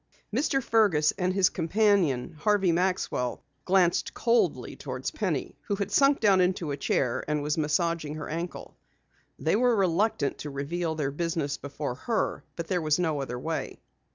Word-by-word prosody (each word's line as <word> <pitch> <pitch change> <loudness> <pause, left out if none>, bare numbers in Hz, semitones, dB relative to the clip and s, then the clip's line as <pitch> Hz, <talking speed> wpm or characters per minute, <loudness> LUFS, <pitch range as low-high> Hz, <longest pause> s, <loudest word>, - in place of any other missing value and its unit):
Mr. 270 0 +1
Fergus 205 -11 +3
and 185 -1 -1
his 185 -1 +3
companion, 175 - +1
Harvey 195 0 +3
Maxwell, 175 -8 -1 0.2
glanced 180 -2 +2
coldly 235 0 +1
toward - - -6
Penny - - -2
who 205 - 0
had 200 0 -3
sunk 275 +5 +4
down 195 -4 +4
into 180 -4 0
a - - -1
chair 130 -2 0
and 150 -1 -1
was 150 +1 0
massaging 155 0 0
her 150 -2 -6
ankle. 170 +3 -5 0.6
They - - +1
were 245 +1 +3
reluctant 190 -4 +1
to 150 - -5
reveal 160 +4 -3
their 145 -3 -1
business 160 -2 -2
before 140 -1 -5
her 220 - -2
but 170 - -4
there 180 0 -1
was 155 -1 +2
no 160 -5 0
other 125 -2 -4
way. 160 +6 -4
170 Hz, 160 wpm, -27 LUFS, 150-195 Hz, 0.6 s, sunk